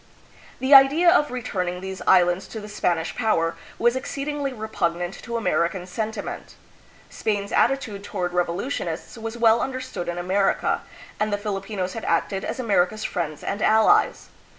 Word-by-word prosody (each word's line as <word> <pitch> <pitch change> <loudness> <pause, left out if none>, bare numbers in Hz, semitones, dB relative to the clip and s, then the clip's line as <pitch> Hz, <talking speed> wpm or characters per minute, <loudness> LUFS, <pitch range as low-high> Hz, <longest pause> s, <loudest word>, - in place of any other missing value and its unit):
The 260 +2 +2
idea 285 +6 +8
of 295 -3 +3
returning 185 -8 -3
these 190 0 -6
islands 180 0 +4
to 220 - -7
the 210 - -8
Spanish 175 -5 -1
power 170 -8 +1 0.2
was 240 +1 +2
exceedingly 280 +1 -3
repugnant 175 -6 -2
to 235 -1 -4
American 180 -4 0
sentiment. 215 +5 -5 0.6
Spain's 205 -2 -2
attitude 235 -6 +1
toward 180 -4 -3
revolutionists 175 - -2
was 225 0 -6
well 230 0 +4
understood 255 -8 -4
in 175 0 -3
America, 190 +3 +1 0.4
and 215 0 0
the 205 - +1
Filipinos 195 -2 -3
had 225 - -6
acted 170 +3 0
as - - -4
America's 215 -3 +1
friends 155 -4 -3
and 205 - -3
allies. 220 - +3
205 Hz, 145 wpm, -24 LUFS, 180-235 Hz, 0.6 s, idea